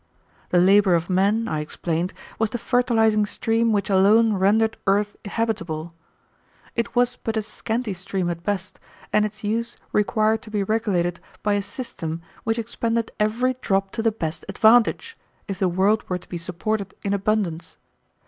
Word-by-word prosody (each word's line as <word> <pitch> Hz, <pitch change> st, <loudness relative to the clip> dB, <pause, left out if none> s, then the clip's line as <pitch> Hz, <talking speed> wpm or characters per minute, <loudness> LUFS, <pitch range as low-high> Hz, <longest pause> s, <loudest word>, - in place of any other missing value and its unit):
The 180 Hz, -, +2 dB
labor 195 Hz, 0 st, +5 dB
of 170 Hz, +2 st, -1 dB
men, 205 Hz, +5 st, +2 dB
I 155 Hz, -, -1 dB
explained, 165 Hz, +3 st, -2 dB, 0.3 s
was 220 Hz, -1 st, +2 dB
the 240 Hz, -, -3 dB
fertilizing 230 Hz, -3 st, +2 dB
stream 225 Hz, +2 st, +1 dB
which 200 Hz, -2 st, +1 dB
alone 210 Hz, +3 st, +5 dB
rendered 215 Hz, +3 st, +3 dB
earth 205 Hz, +1 st, +2 dB
habitable. 170 Hz, -7 st, -2 dB, 0.8 s
It 235 Hz, 0 st, -2 dB
was 245 Hz, 0 st, +2 dB
but 225 Hz, 0 st, -3 dB
a 220 Hz, -, 0 dB
scanty 225 Hz, +1 st, -3 dB
stream 185 Hz, 0 st, -3 dB
at 170 Hz, -1 st, -3 dB
best, 190 Hz, +1 st, -3 dB, 0.3 s
and 210 Hz, -, +4 dB
its 215 Hz, 0 st, -7 dB
use 230 Hz, +3 st, -1 dB
required 215 Hz, +1 st, +2 dB
to 220 Hz, -, -12 dB
be 210 Hz, -2 st, 0 dB
regulated 190 Hz, -5 st, 0 dB, 0.2 s
by 210 Hz, -, +2 dB
a 205 Hz, -, +1 dB
system 170 Hz, -7 st, -5 dB, 0.2 s
which 225 Hz, 0 st, +1 dB
expended 230 Hz, 0 st, -1 dB
every 230 Hz, +5 st, +1 dB
drop 195 Hz, -1 st, 0 dB
to 230 Hz, -, -3 dB
the 225 Hz, 0 st, +2 dB
best 165 Hz, -7 st, -4 dB
advantage, 240 Hz, -, +3 dB, 0.3 s
if 195 Hz, -2 st, -5 dB
the 190 Hz, -, +2 dB
world 195 Hz, +5 st, +1 dB
were 180 Hz, -, 0 dB
to 180 Hz, -, -16 dB
be 175 Hz, -, -4 dB
supported 190 Hz, +4 st, -3 dB
in 200 Hz, -, 0 dB
abundance. 200 Hz, -4 st, -1 dB
210 Hz, 165 wpm, -23 LUFS, 185-225 Hz, 0.8 s, labor